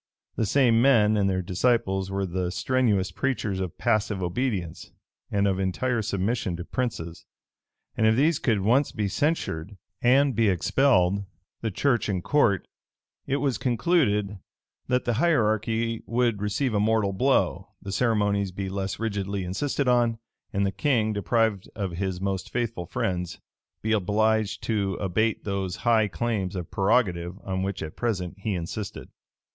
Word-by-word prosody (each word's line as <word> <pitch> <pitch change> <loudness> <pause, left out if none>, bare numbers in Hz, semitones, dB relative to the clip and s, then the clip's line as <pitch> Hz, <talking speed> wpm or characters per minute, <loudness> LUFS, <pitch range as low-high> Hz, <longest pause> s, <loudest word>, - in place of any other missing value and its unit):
The 110 - 0
same 115 -1 +4
men 110 -5 +5
and 100 -2 +2
their 95 -1 -1
disciples 95 0 +1
were 95 0 -1
the 90 0 -2
strenuous 105 -5 +1
preachers 105 -4 -2
of 90 -3 -4
passive 105 -4 0
obedience, 90 -3 -2 0.4
and 100 0 +1
of 95 -1 0
entire 110 +6 0
submission 100 -2 -1
to 85 - -6
princes; 90 -11 -4 0.7
and 110 - +3
if 110 - +4
these 150 +5 +3
could 110 -5 +1
once 125 +8 +3
be 105 -2 -2
censured, 100 - -1 0.2
and 135 +1 +4
be 110 -1 +3
expelled 100 -1 +2 0.4
the 115 - -1
church 120 +3 +1
and 95 -3 -1
court, 105 - +2 0.6
it 135 - +1
was 140 -3 0
concluded, 115 - +1 0.5
that 125 -1 +1
the 120 - +1
hierarchy 115 -6 +1
would 115 -3 +1
receive 110 +5 0
a 105 - +2
mortal 105 -2 +2
blow, 130 +7 +1
the 100 - -7
ceremonies 105 -3 +1
be 95 +1 -4
less 95 0 -3
rigidly 100 -3 -2
insisted 135 +9 -1
on, 120 -2 +3 0.3
and 100 0 0
the 95 - 0
king, 115 -4 +1
deprived 105 -1 0
of 100 -4 -3
his 90 +1 -3
most 95 0 -2
faithful 115 -8 -3
friends, 90 -2 -2 0.4
be 110 - 0
obliged 110 +1 +1
to 100 -4 0
abate 105 +4 0
those 95 -3 -2
high 110 -2 +4
claims 100 -3 -2
of 90 -3 -5
prerogative 95 -4 +1
on 95 -1 -2
which 95 0 -3
at 80 - -7
present 95 -7 -2
he 100 0 -2
insisted. 90 +4 -5
105 Hz, 150 wpm, -26 LUFS, 95-120 Hz, 0.7 s, men